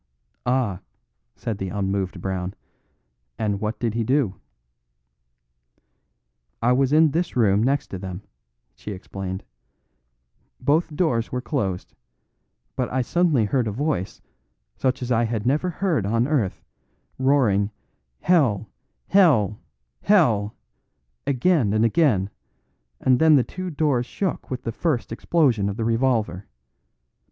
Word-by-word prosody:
"Ah!" 120 -7 +1 0.6
said 110 -3 -4
the 95 - -3
unmoved 95 -2 -2
Brown, 95 0 -3 0.8
"and 105 -2 -1
what 110 +1 -2
did 115 -3 -1
he 115 0 0
do?" 130 -4 +1 2.3
"I 120 +2 +2
was 130 +1 +2
in 155 0 +5
this 170 +4 -1
room 105 -4 +3
next 135 +4 +1
to 95 - -6
them," 95 +1 -7 0.5
she 105 - -7
explained; 95 0 -6 1.2
"both 150 +4 +1
doors 120 -10 0
were 125 - -1
closed, 100 - -3 0.8
but 125 -2 -2
I 130 0 +1
suddenly 160 -5 +2
heard 120 +2 0
a - - -1
voice, 130 - -2 0.5
such 130 -1 -1
as 125 - -4
I 120 0 +3
had 110 -1 -3
never 150 +8 +1
heard 170 - 0
on 115 +3 +1
earth, 130 -11 -1 0.6
roaring 125 -7 +3 0.5
'Hell, 145 - +2 0.4
hell, 135 - +4 0.4
hell,' 120 - +3 0.7
again 140 - +2
and 110 +1 +3
again, 115 - +2 0.7
and 130 -1 +3
then 160 -1 +6
the 130 - +4
two 185 +9 -6
doors 145 -6 0
shook 190 +5 -3
with 130 -1 -4
the 115 - -2
first 135 -2 -1
explosion 120 -5 +1
of 100 - -5
the 115 - -1
revolver. 115 -6 0
120 Hz, 125 wpm, -23 LUFS, 100-145 Hz, 2.3 s, then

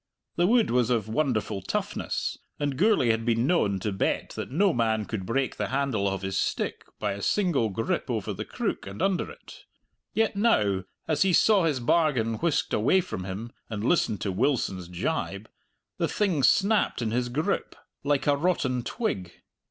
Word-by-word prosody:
The 175 +1 +3
wood 235 +1 +3
was 125 -1 +2
of 115 -4 +1
wonderful 110 -5 -1
toughness, - - -3 0.2
and 145 -2 -1
Gourlay 170 - +4
had 115 0 -1
been 115 0 +1
known 105 - +2
to 105 - -1
bet 95 - -1
that - - -5
no 180 +7 +2
man 110 -2 +1
could 95 -4 -5
break 135 +2 -1
the - - -1
handle 135 -7 0
of 95 -1 -2
his 95 0 -2
stick - - -2
by - - -1
a 100 +1 -5
single 170 - +1
grip 115 +3 -2
over - - -2
the - - -5
crook - - -3
and 100 +2 -8
under 195 -2 +1
it. - - -13 0.5
Yet 225 -2 +2
now, 105 - +2 0.2
as 155 - 0
he 190 -1 +4
saw 200 -1 +5
his 150 -5 +1
bargain 120 -5 +1
whisked 165 0 0
away 125 - +4
from 95 - -6
him 100 +5 -5 0.2
and 105 -2 -4
listened 120 - +1
to 100 - -1
Wilson's 95 -5 0
jibe, 90 0 -3 0.5
the - - +2
thing 190 -9 0
snapped 200 - +3
in 110 - -1
his 120 +1 0
grip 155 +10 -1 0.3
like 140 -1 +1
a 145 - +4
rotten 140 -6 0
twig. 100 - -3
125 Hz, 180 wpm, -27 LUFS, 105-170 Hz, 0.5 s, saw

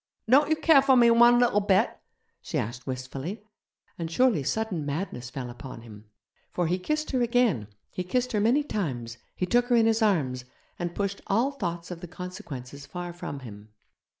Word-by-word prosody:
'Don't 280 +6 +5
you 315 - +4
care 315 -2 +5
for 270 -1 +4
me 235 -1 +6
one 240 +1 +7
little 240 -4 +3
bit?' 195 -2 +2 0.5
she - - -4
said 120 +3 -3
wistfully, 135 - -5 0.5
and 165 -1 -3
surely 230 - +3
sudden 195 +2 -2
madness 145 -4 -4
fell 125 0 -5
upon 120 0 -9
him. 105 -2 -13 0.4
For 175 - -1
he 180 +3 0
kissed 305 +10 -2
her 255 -3 +1
again, 235 - +2 0.2
he 180 - -3
kissed 250 +7 -1
her 215 - +1
many 240 +8 +3
times, 125 - -4 0.2
he 180 - -1
took 240 +6 +3
her 245 - +3
in 230 -1 +5
his 225 0 +2
arms, 140 - +1 0.4
and 175 -1 -3
pushed 200 -1 -2
all 235 +8 +2
thoughts 175 -10 -4
of 170 -1 -7
the 175 - -7
consequences 145 -7 -8
far 175 +2 -6
from 145 -5 -6
him. 105 -3 -11
180 Hz, 185 wpm, -27 LUFS, -, 0.5 s, one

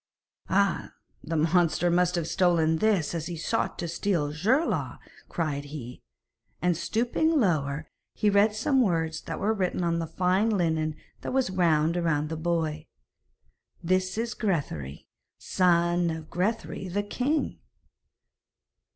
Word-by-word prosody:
'Ah! - - +1 0.3
the 165 - -3
monster 170 +1 +2
must 180 +1 +2
have 170 -2 -1
stolen 165 -4 +2
this 200 -6 +1
as 165 -1 -3
he 175 -2 -5
sought 155 - -1
to 170 - -3
steal 170 -3 -1
Geirlaug,' 230 - 0 0.3
cried 145 -4 -2
he. 135 -4 -8 0.6
And 175 0 +1
stooping 245 - +1
lower, 155 - 0 0.3
he 210 - 0
read 205 +1 +4
some 260 +5 +2
words 165 -6 0
that - - -6
were 215 +2 +1
written 185 -3 -1
on 170 -1 +1
the 165 - -3
fine 185 +6 +1
linen 160 -6 0 0.3
that - - -4
was 260 -7 +1
wound 165 -2 +2
round 155 -3 0
the 160 - -3
boy. 160 -2 -2 1.0
'This 185 +3 0
is 230 -1 -1
Grethari, 140 - -3 0.3
son 175 -1 +2
of 160 -1 -6
Grethari 195 +1 -2
the 200 +3 -1
king!' 270 +9 -1
175 Hz, 135 wpm, -27 LUFS, 160-200 Hz, 1.0 s, read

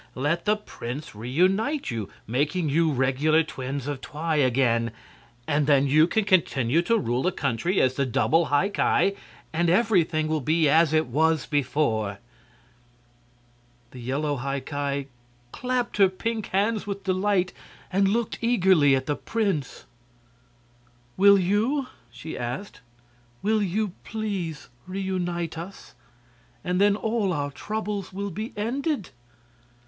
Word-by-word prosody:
"Let 150 +6 -1
the 210 0 +3
prince 145 - -7
reunite 185 - 0
you, 110 -4 -4 0.2
making 150 +7 0
you 160 +2 +2
regular 140 +4 +2
twins 135 -2 -5
of 145 -2 -4
Twi 155 +2 -2
again, 120 -4 +2 0.6
and 145 -1 +1
then 140 -2 +4
you 155 +4 +5
can 220 +2 0
continue 160 - +2
to 230 +7 +2
rule 125 - -1
the 180 - +1
country 140 - -1
as 130 -1 +3
the 140 +1 0
double 165 +7 +2
High 145 +8 +2
Ki, 200 -1 +2 0.4
and 170 +1 +1
everything 175 -6 +2
will 155 -1 0
be 155 +4 +2
as 160 +2 +4
it 155 0 +3
was 160 +5 +1
before." 125 -8 0 1.7
The 130 - -10
yellow 140 +4 -2
High 135 +2 -3
Ki 140 0 -3 0.4
clapped 250 -2 -2
her 195 -2 +6
pink 220 +3 -3
hands 210 +2 0
with 200 -1 -4
delight 185 -1 +1 0.4
and 195 +1 +3
looked 225 +3 -1
eagerly 185 - +4
at 130 0 -2
the 145 - -1
prince. 195 -10 -2 1.3
"Will 200 +1 +7
you?" 215 +10 +1 0.3
she 125 +6 -8
asked. 125 +12 -5 0.6
"Will 215 +1 +2
you 205 +2 0
please 195 -8 -4 0.2
reunite 180 -3 -3
us? 185 +4 -10 0.7
And 180 +1 0
then 205 0 +5
all 220 -2 0
our 145 -3 -2
troubles 210 +2 -4
will 200 +1 -4
be 215 +7 -5
ended!" 260 - -2
165 Hz, 135 wpm, -25 LUFS, 140-200 Hz, 1.7 s, Will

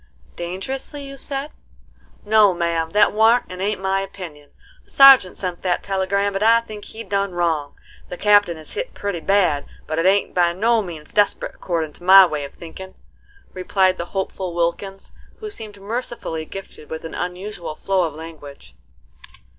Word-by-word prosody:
"Dangerously 260 +11 -5
you 275 0 -8
said?" 275 +2 -4 0.7
"No, 210 -3 +5
ma'am, 170 -1 -1
that 205 +4 +4
warn't 225 +3 +4
and 185 0 -7
ain't 205 +1 -1
my 190 0 0
opinion. 170 -7 -9 0.3
The - - -29
sergeant 270 -9 +7
sent 180 -2 -4
that 180 -2 -1
telegram, 200 +1 0
and 195 +2 -1
I 230 +1 +5
think 215 -2 -10
he 225 - -8
done 200 -2 -1
wrong. 165 -5 -1 0.3
The 180 - -6
Captain 205 -4 +4
is 155 - -10
hit - - -5
pretty 200 -4 -3
bad; 175 -5 +1 0.2
but 155 +1 -2
it 170 - +2
ain't 200 +1 +2
by 175 -1 +2
no 225 +5 +2
means 165 -6 -9
desperate 205 -1 +1
accordin' 165 -4 -3
to - - -14
my 190 +1 +9
way 150 -4 -3
of 140 - -12
thinkin'," 185 +3 -10 0.6
replied 185 0 +1
the 170 - -2
hopeful 185 -2 -3
Wilkins, 175 +3 -3 0.2
who 430 -1 -7
seemed 215 - -7
mercifully 205 -6 -4
gifted 190 -4 -10
with 160 0 -6
an 165 - -7
unusual 180 -2 -5
flow 190 +3 0
of 160 -4 -2
language. 145 - -11
190 Hz, 170 wpm, -21 LUFS, 170-205 Hz, 0.7 s, my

